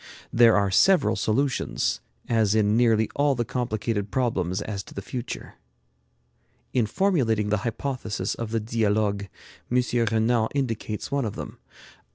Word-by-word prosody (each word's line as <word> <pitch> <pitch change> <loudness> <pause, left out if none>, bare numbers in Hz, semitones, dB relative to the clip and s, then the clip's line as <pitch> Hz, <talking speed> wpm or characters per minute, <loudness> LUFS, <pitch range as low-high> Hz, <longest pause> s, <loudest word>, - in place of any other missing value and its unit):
There 115 -2 +6
are 100 -1 +1
several 115 - +4
solutions, 125 +6 0 0.3
as 110 -3 +2
in 105 -1 +3
nearly 115 -2 +3
all 145 -1 +2
the 120 -1 -1
complicated 110 -3 -2
problems 95 -8 0
as 100 -1 -4
to - - -13
the 100 - -4
future. 120 +5 -6 1.2
In 120 -4 +2
formulating 115 - +1
the 105 - +2
hypothesis 120 -1 -3
of 115 -2 -5
the 115 0 0
'Dialogues,' 105 -2 0 0.4
M. 125 0 +3 0.3
Renan 110 +1 +2
indicates 115 -5 -3
one 140 -3 0
of 105 - -4
them. - - -8
110 Hz, 140 wpm, -25 LUFS, 105-125 Hz, 1.2 s, There